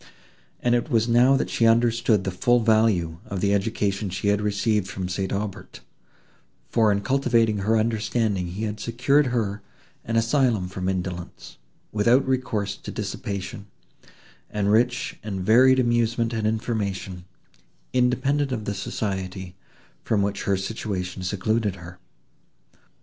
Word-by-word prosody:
And 120 - +3
it 120 +5 0
was 115 -3 +2
now 125 +3 +5
that - - -2
she 115 - +3
understood 115 -2 +3
the 95 - -2
full 120 +7 +2
value 110 -8 +2
of 100 - -4
the 100 +1 +1
education 100 -1 -1
she 95 +3 -1
had 105 0 +2
received 105 -1 0
from 95 -1 -4
St. 95 +1 -3
Aubert, 100 -1 -5 0.9
for 110 -3 +4
in 100 0 0
cultivating 115 -3 +2
her 110 +3 +2
understanding 110 -3 0
he 95 +5 -5
had 105 0 -3
secured 130 +6 +2
her 110 -4 -1 0.4
an 115 - -3
asylum 115 -4 +2
from 95 0 -3
indolence, 90 -2 -5 0.3
without 120 +6 +3
recourse 110 -6 -1
to - - -10
dissipation, 100 -1 -5 0.8
and 105 -1 0
rich 120 +2 +1
and 100 -3 -4
varied 125 +7 +5
amusement 120 -1 +1
and 110 -1 0
information, 100 -5 -3 0.7
independent 130 +3 +1
of 110 -4 -3
the 100 - -2
society, 95 -2 -4 0.5
from 105 -3 +1
which 100 0 -2
her 100 -1 +2
situation 95 -2 -4
secluded 105 +2 -1
her. 90 0 -12
105 Hz, 140 wpm, -24 LUFS, 95-115 Hz, 0.9 s, now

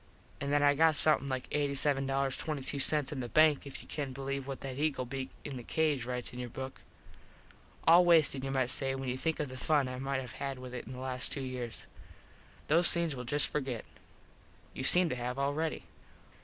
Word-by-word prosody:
An 140 - -3
that 145 0 +3
I 145 0 +6
got 160 +2 +4
somethin 150 -3 +4
like 130 -1 -3
$87.22 140 0 0
in 145 - -4
the 120 -2 -4
bank 155 -1 +4
if 140 - -8
you - - -18
can 140 -3 -4
believe 135 0 -4
what 135 -1 -5
that 135 0 -5
eagle 150 -4 0
beak 130 +1 -4 0.2
in 140 -3 -5
the 120 - -7
cage 150 -3 0
rites 125 -1 -3
in 125 - -7
your 125 -1 -4
book. 130 +2 -7 1.0
All 170 +3 +8
wasted 160 -6 +4
you 135 - -2
might 130 -2 +1
say, 135 -1 -1
when 135 -1 -4
you 125 - -2
think 160 +2 -1
of 150 - -2
the 130 - -8
fun 145 0 +2
I 130 0 -5
might 135 0 -1
have 125 -3 -6
had 135 -1 -2
with 125 0 -9
it 125 - -6
in 130 - -7
the 125 - -8
last 130 -1 -1
two 140 - -3
years. 125 -3 -5 0.8
Those 170 +3 +5
things 170 -4 0
we'll 125 -1 -6
just 145 +4 +3
forget. 130 -6 -3 0.9
You 130 - -5
seem 180 +6 +5
to - - -1
have 125 +1 -3
already. 145 +3 -1
135 Hz, 210 wpm, -32 LUFS, 130-150 Hz, 1.0 s, All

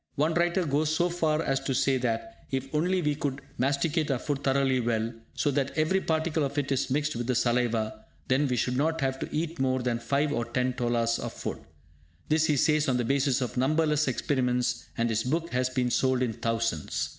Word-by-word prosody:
One 155 +3 +1
writer 175 +2 +1
goes 150 +1 +1
so 170 +3 +2
far 160 -2 0
as 135 - +1
to 135 - -2
say 135 +1 +2
that, 115 -2 -3
if 135 +1 -3
only 180 +4 +1
we 150 -1 +1
would 135 -1 -1 0.2
masticate 145 +4 +1
our 135 - +1
food 140 +1 -3
thoroughly 135 -1 +2
well, 115 -1 -1 0.2
so 145 - +1
that 140 +2 -1
every 160 +5 +2
particle 160 -1 0
of 140 +1 -3
it 140 -1 -1
is 135 0 0
mixed 150 +2 0
with 120 0 -3
the 125 - +1
saliva, 115 -3 0 0.2
then 140 +2 +2
we 125 - 0
should 125 +1 0
not 160 +4 +1
have 135 0 -1
to - - -4
eat 165 +2 -2
more 130 -1 +1
than 120 -1 0
five 145 +4 0
or 120 - 0
ten 125 +2 0
tolas 120 -1 0
of - - -5
food. - - -5 0.7
This 155 +1 +3
he 150 - +2
says 155 +1 +3
on 125 - +2
the 120 - 0
basis 135 +1 +1
of 125 -1 -3
numberless 150 +2 +2
experiments, 125 -2 0
and 115 - +1
his 110 -1 0
book 165 +6 -1
has 125 0 +1
been 130 -1 0
sold 130 +1 +2
in 120 -3 -1
thousands. 115 -8 -1
135 Hz, 215 wpm, -28 LUFS, 125-150 Hz, 0.7 s, This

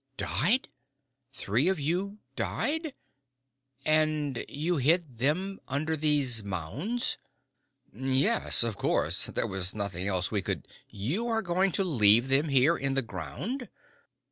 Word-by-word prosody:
"Died! 240 +8 +1 0.6
Three 130 - 0
of 190 -3 +1
you 180 +8 -2 0.2
died? 315 -1 -2 0.9
And 155 -4 +2
you 160 +4 -1
hid 145 -2 +1
them 180 +9 0
under 155 +4 -1
these 145 -7 +1
mounds?" 105 - -2 0.7
"Yes. 135 - +3
Of 115 -3 -2
course. - - +1
There - - -1
was 95 0 -1
nothing 100 -3 -3
else 90 -2 0
we 105 -3 0
could - - -4 0.2
" - - -45 0.2
"You 220 +10 -1
are 225 -1 0
going 185 +2 +1
to 195 - +1
leave 120 - +4
them 140 +4 +4
here 135 +5 +4
in 135 -2 -2
the 135 - +1
ground!" 115 - -6
145 Hz, 135 wpm, -28 LUFS, 115-185 Hz, 0.9 s, leave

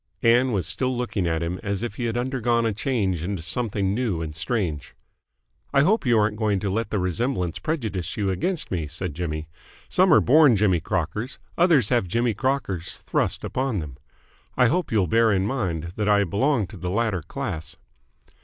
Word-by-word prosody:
Ann 120 +3 +4
was 95 -7 0
still 125 +9 -1
looking 110 -7 -1
at 80 0 0
him 90 +2 -3
as 100 0 -3
if 120 - -3
he 120 +2 -4
had 115 0 -1
undergone 120 -2 0
a 110 - +1
change 100 - -1
into 90 -1 -3
something 100 +1 0
new 110 -7 -1
and 80 -2 -4
strange. 85 - -3 0.8
"I 140 - +6
hope 185 - +2
you 120 -2 +4
aren't 105 0 +1
going 105 -3 +1
to 100 -2 -1
let 115 +3 -1
the 105 - -1
resemblance 90 -1 -1
prejudice 110 - -3
you 100 -2 0
against 160 - -2
me?" 85 -5 -2
said 80 +2 -4
Jimmy. 80 -1 -4 0.4
"Some 185 0 +4
are - - +8
born 145 -2 +6
Jimmy 95 -4 +3
Crockers, 95 - -2 0.2
others 165 - +4
have 120 -7 +2
Jimmy 115 +5 +1
Crockers 110 -7 -2
thrust - - -1
upon 130 -4 -1
them. 75 -7 -5 0.6
I 125 -2 +5
hope 180 +4 0
you'll 105 -4 +3
bear 115 +6 +3
in 95 -1 +1
mind 90 - -2
that 105 -1 0
I 100 -1 +4
belong 115 - +1
to 105 - -10
the 90 0 -4
latter 105 -2 0
class." 90 - -5
105 Hz, 190 wpm, -24 LUFS, 90-125 Hz, 0.8 s, are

